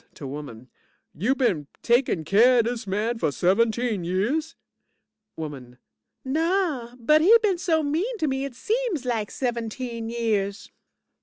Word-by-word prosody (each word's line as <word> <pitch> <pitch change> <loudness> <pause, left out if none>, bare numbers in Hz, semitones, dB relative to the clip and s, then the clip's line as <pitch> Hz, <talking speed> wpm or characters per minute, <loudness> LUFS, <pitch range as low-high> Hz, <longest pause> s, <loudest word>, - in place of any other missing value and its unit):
(to 145 - -9
woman) 135 -4 -8 0.5
You 225 - 0
been 185 - 0 0.2
takin' 235 -8 +2
keer 230 +9 +5
of 230 - +3
dis 235 -2 -3
man 215 +4 -1
for 150 - +1
seventeen 220 - +1
years? 240 - -1 0.8
WOMAN 135 -6 -8 0.5
Naw, 310 -4 0
but 300 +6 +4
he 425 +8 +7
been 385 -5 +1
so 325 -3 +1
mean 345 +12 -1
to 320 - -1
me, 265 -2 -1
it 275 -3 -6
seems 435 - -1
lak 225 -4 -1
seventeen 235 -1 -4
years. 215 -4 -2
235 Hz, 140 wpm, -25 LUFS, 200-300 Hz, 0.8 s, he